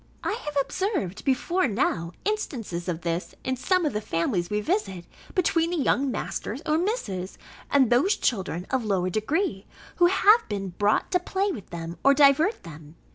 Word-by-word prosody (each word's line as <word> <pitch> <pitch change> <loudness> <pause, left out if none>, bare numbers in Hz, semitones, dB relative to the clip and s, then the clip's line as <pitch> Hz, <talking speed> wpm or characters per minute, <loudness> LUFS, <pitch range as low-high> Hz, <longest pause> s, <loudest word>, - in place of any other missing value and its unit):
I - - 0
have 295 -11 -5
observed, 290 - -2
before 285 +6 +1
now, 170 -6 -1
instances 235 - -3
of 175 -2 -2
this, 170 +1 -3
in 260 - -1
some 350 +8 +1
of 300 - 0
the 210 - -2
families 175 -1 -1
we 210 - 0
visit, 210 - -2 0.3
between 335 -2 +2
the 350 - -1
young 275 -1 +1
Masters 245 -1 -4
or 310 0 +2
Misses, 205 - -3 0.3
and 265 -5 +3
those 335 - +3
children 185 -6 -1
of 260 -2 +1
lower 190 -4 0
degree, 215 - -1 0.3
who 350 - +6
have 415 +5 +4
been 195 -2 -3
brought 205 +4 +1
to 360 - +3
play 385 +3 -1
with 210 - -8
them, 170 0 -7
or 275 0 +6
divert 295 - +4
them. 155 -1 -12
250 Hz, 175 wpm, -26 LUFS, -, 0.3 s, who